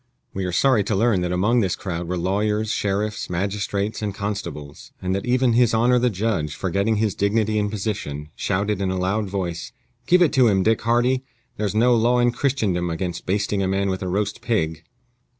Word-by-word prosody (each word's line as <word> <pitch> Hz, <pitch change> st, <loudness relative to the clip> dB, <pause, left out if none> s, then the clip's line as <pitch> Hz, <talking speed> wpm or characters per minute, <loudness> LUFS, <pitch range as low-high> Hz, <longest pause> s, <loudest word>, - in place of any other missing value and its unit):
We 95 Hz, -1 st, -3 dB
are 90 Hz, -, -2 dB
sorry 120 Hz, +2 st, +3 dB
to 105 Hz, -, 0 dB
learn 105 Hz, -2 st, +2 dB
that 90 Hz, 0 st, -1 dB
among 105 Hz, +7 st, +2 dB
this 95 Hz, -6 st, +1 dB
crowd 90 Hz, -2 st, -5 dB
were 90 Hz, +1 st, -2 dB
lawyers, 105 Hz, +4 st, 0 dB
sheriffs, 105 Hz, +1 st, -2 dB
magistrates, 100 Hz, +3 st, -2 dB
and 105 Hz, -2 st, -3 dB
constables; 85 Hz, -9 st, -6 dB
and 95 Hz, 0 st, -2 dB
that 100 Hz, +4 st, -3 dB
even 125 Hz, -1 st, +3 dB
his 120 Hz, -1 st, +3 dB
honor 125 Hz, +2 st, +4 dB
the 125 Hz, +1 st, +2 dB
judge, 95 Hz, -7 st, -1 dB
forgetting 100 Hz, +4 st, 0 dB
his 105 Hz, -2 st, 0 dB
dignity 110 Hz, +1 st, +1 dB
and 105 Hz, 0 st, 0 dB
position, 95 Hz, -9 st, -4 dB
shouted 100 Hz, +1 st, -1 dB
in 95 Hz, -, 0 dB
a 95 Hz, -, -1 dB
loud 95 Hz, +3 st, -1 dB
voice, 90 Hz, -4 st, -4 dB, 0.3 s
"Give 180 Hz, 0 st, +5 dB
it 160 Hz, -, +2 dB
to 130 Hz, -4 st, +5 dB
him, 95 Hz, -3 st, +3 dB
Dick 110 Hz, +1 st, +2 dB
Hardy! 120 Hz, +3 st, +2 dB, 0.3 s
There's 105 Hz, -1 st, -2 dB
no 120 Hz, +3 st, +4 dB
law 120 Hz, +2 st, +3 dB
in 120 Hz, 0 st, +3 dB
Christendom 110 Hz, -10 st, 0 dB
against 85 Hz, +1 st, -4 dB
basting 100 Hz, +1 st, 0 dB
a 95 Hz, -, 0 dB
man 95 Hz, 0 st, 0 dB
with 95 Hz, +1 st, -3 dB
a 95 Hz, -, -3 dB
roast 105 Hz, +3 st, -2 dB
pig!" 80 Hz, -9 st, -1 dB
100 Hz, 200 wpm, -22 LUFS, 95-115 Hz, 0.3 s, Give